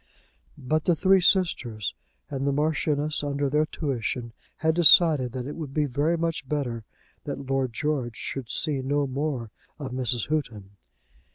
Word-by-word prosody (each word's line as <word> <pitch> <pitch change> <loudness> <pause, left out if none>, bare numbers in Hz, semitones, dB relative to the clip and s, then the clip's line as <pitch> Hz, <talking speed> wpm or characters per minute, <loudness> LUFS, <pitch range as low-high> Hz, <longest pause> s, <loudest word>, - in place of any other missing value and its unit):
But 150 +4 -1
the 175 - +3
three 190 +4 +4
sisters, 135 - +1 0.3
and 140 -1 -3
the - - +3
Marchioness 150 0 0
under 140 -1 -1
their 150 +1 +2
tuition, 125 -6 -3 0.2
had 160 0 +1
decided 160 -6 +6
that 125 -2 -4
it 145 - -6
would 150 -5 -7
be 150 -1 +2
very 145 +5 0
much 165 -5 -2
better 120 -7 -2 0.4
that 140 - -5
Lord 135 -1 0
George 130 -3 -2
should 130 0 -5
see 145 -4 -1
no 145 +2 0
more 135 -4 -3 0.3
of 140 -4 -6
Mrs. 125 -3 0
Houghton. 115 -11 -3
140 Hz, 155 wpm, -26 LUFS, 130-155 Hz, 0.4 s, decided